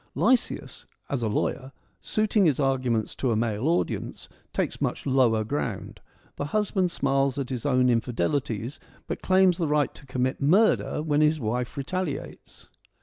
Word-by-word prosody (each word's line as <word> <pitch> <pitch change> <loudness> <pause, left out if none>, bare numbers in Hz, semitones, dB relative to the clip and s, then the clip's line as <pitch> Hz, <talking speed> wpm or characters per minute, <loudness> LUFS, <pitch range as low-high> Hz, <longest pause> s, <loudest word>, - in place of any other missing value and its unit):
Lysias, 255 -1 0 0.2
as 140 -3 -1
a 115 - 0
lawyer, 130 +5 -2 0.3
suiting 215 -3 +2
his 150 -3 +1
arguments 130 -5 0
to 130 - -1
a - - +2
male 110 +3 -1
audience, 170 +2 -1 0.2
takes - - -2
much - - -2
lower 125 -5 +3
ground. 115 -4 -4 0.4
The 145 - -2
husband 195 +1 0
smiles 135 -3 0
at 135 -2 -3
his 125 +1 -3
own 125 -2 +3
infidelities, 115 - -1 0.3
but - - -5
claims 185 -1 +4
the 165 - +1
right 150 -1 +1
to 135 - -14
commit 130 +1 -1
murder 170 0 +3
when 150 -1 +2
his 155 +1 +3
wife 120 +2 -2
retaliates. 145 +1 -5
135 Hz, 150 wpm, -26 LUFS, 125-155 Hz, 0.4 s, claims